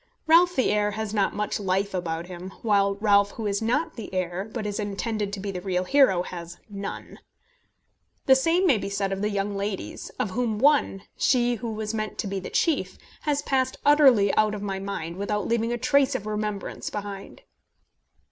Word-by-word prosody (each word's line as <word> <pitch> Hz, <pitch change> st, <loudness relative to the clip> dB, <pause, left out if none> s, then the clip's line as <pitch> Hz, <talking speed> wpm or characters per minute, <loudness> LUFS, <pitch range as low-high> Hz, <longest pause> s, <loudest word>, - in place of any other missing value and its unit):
Ralph 345 Hz, +3 st, +5 dB
the 260 Hz, -, +2 dB
heir 210 Hz, 0 st, +2 dB
has 220 Hz, -1 st, -3 dB
not 200 Hz, -3 st, +1 dB
much 210 Hz, +1 st, -2 dB
life 195 Hz, 0 st, 0 dB
about 170 Hz, -2 st, -3 dB
him; 180 Hz, +1 st, -8 dB
while 200 Hz, -3 st, +3 dB
Ralph 200 Hz, -1 st, +3 dB
who 225 Hz, -, -5 dB
is 200 Hz, 0 st, 0 dB
not 250 Hz, +9 st, 0 dB
the 225 Hz, -, -7 dB
heir, 185 Hz, +2 st, -3 dB
but 225 Hz, -2 st, -4 dB
is 205 Hz, 0 st, -3 dB
intended 205 Hz, 0 st, -2 dB
to 200 Hz, -, -4 dB
be 200 Hz, +1 st, -4 dB
the 180 Hz, -2 st, -5 dB
real 180 Hz, -1 st, -1 dB
hero, 195 Hz, -6 st, +4 dB
has 175 Hz, -1 st, -8 dB
none. 200 Hz, -2 st, -7 dB, 1.1 s
The 265 Hz, -, +7 dB
same 330 Hz, +7 st, +2 dB
may 270 Hz, -, +4 dB
be 200 Hz, -, -4 dB
said 200 Hz, -1 st, -1 dB
of 195 Hz, 0 st, -2 dB
the 210 Hz, -, +1 dB
young 200 Hz, 0 st, -2 dB
ladies, 200 Hz, -1 st, -4 dB
of 195 Hz, -, -1 dB
whom 225 Hz, 0 st, -1 dB
one, 270 Hz, -6 st, +3 dB
she 245 Hz, -2 st, +3 dB
who 230 Hz, 0 st, -4 dB
was 215 Hz, 0 st, -4 dB
meant 215 Hz, -1 st, -3 dB
to -, -, -2 dB
be 195 Hz, 0 st, -3 dB
the 185 Hz, -, -7 dB
chief, 325 Hz, -4 st, 0 dB, 0.3 s
has 290 Hz, 0 st, +1 dB
passed 260 Hz, -1 st, 0 dB
utterly 270 Hz, -9 st, +6 dB
out 215 Hz, 0 st, +2 dB
of 205 Hz, -, -6 dB
my 195 Hz, -1 st, -3 dB
mind, 180 Hz, -4 st, -5 dB
without 205 Hz, 0 st, -2 dB
leaving 230 Hz, 0 st, 0 dB
a 240 Hz, -, -1 dB
trace 280 Hz, +1 st, +2 dB
of 215 Hz, -, -3 dB
remembrance 210 Hz, -1 st, -3 dB
behind. 205 Hz, -, -7 dB
210 Hz, 195 wpm, -25 LUFS, 195-235 Hz, 1.1 s, The